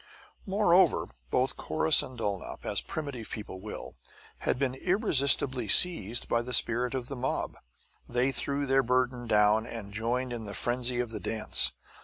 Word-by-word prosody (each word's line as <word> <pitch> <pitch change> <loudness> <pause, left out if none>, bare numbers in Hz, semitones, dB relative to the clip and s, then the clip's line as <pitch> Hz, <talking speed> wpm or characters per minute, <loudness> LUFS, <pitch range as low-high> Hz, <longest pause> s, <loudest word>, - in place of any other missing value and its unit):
Moreover, 190 -2 +2 0.2
both 125 - 0
Corrus 155 0 +3
and 130 - -9
Dulnop, 100 -4 -5
as - - +2
primitive 140 -7 -6
people 105 -4 -8
will, - - -7 0.5
had - - -1
been 130 -1 -1
irresistibly 135 - +2
seized 120 - +4
by 115 - 0
the 125 +1 -6
spirit 120 +3 +1
of 125 -2 -4
the 140 - -6
mob. 130 +1 -3 0.5
They 125 +2 0
threw 140 +3 -3
their 135 0 +3
burden 125 -1 -1
down 105 +1 +2
and 105 -4 -8
joined 120 +3 -2
in 115 -2 -6
the 100 -1 -6
frenzy 120 0 0
of 120 -2 -3
the - - -5
dance. 110 -1 +2
125 Hz, 160 wpm, -28 LUFS, 115-135 Hz, 0.5 s, seized